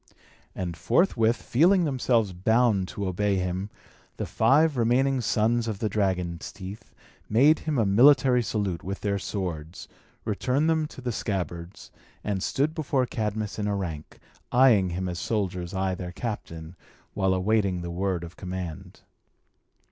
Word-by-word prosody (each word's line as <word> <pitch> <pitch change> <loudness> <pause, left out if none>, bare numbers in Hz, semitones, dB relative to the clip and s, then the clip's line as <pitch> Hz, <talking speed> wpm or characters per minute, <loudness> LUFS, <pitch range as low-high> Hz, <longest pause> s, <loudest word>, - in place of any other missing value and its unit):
And 90 -2 -4
forthwith, 115 - +2
feeling 175 +8 +3
themselves 125 -7 +1
bound 110 +1 +2
to 100 - -5
obey 100 +2 0
him, 90 +2 -2 0.5
the - - -2
five 145 +7 +3
remaining 125 +3 +2
sons 115 +2 +1
of 110 -3 -3
the 110 +1 -1
dragon's 90 -4 -1
teeth 95 +2 -10 0.4
made 140 +9 +5
him 155 -3 -2
a 115 - +3
military 125 +4 +5
salute 100 -6 -2
with 95 +1 -5
their 100 -1 0
swords, 90 -5 -5 0.4
returned 125 +7 0
them 160 -1 +1
to 130 - -12
the 125 -1 -2
scabbards, 90 -4 -4 0.3
and 100 -3 -2
stood 145 +10 0
before 140 -5 0
Cadmus 110 -2 -3
in 105 - -1
a 100 - 0
rank, 80 -6 -5 0.3
eyeing 120 -7 +5
him 90 +2 -3
as 90 -1 -4
soldiers 90 -4 -2
eye 95 -1 -1
their 90 -1 -6
captain, 90 -6 -6 0.4
while 95 -2 +1
awaiting 95 -1 +1
the 85 - -5
word 90 0 -1
of 85 +1 -9
command. 90 -4 -7
100 Hz, 150 wpm, -26 LUFS, 90-120 Hz, 0.5 s, made